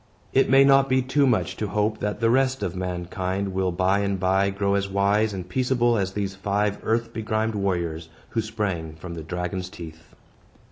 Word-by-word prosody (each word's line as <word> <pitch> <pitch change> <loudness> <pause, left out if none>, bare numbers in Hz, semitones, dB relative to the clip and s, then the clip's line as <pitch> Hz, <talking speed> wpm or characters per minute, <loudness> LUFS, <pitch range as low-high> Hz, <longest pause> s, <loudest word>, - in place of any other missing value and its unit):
It 135 - +3
may 135 +1 +7
not 135 0 +5
be 130 0 +3
too 135 +2 +2
much 120 -3 +1
to 105 - -2
hope 105 +2 0
that 105 +2 -3
the 115 0 +3
rest 130 -2 +2
of 90 -2 -2
mankind 90 +2 -3
will 95 -1 0
by 95 +3 +2
and 100 -1 -1
by 95 +1 +2
grow 100 0 0
as 100 0 0
wise 100 +2 +2
and 95 -3 -6
peaceable 120 +2 +1
as 95 -3 -1
these 100 -1 -2
five 100 +1 -1
earth 115 +1 -1
begrimed 110 0 -1
warriors, 85 -5 -2 0.2
who 115 - 0
sprang 100 -8 -3
from 85 +2 -8
the 85 - -6
dragon's 90 +3 -4
teeth. 80 -3 -11
100 Hz, 190 wpm, -24 LUFS, 90-110 Hz, 0.2 s, may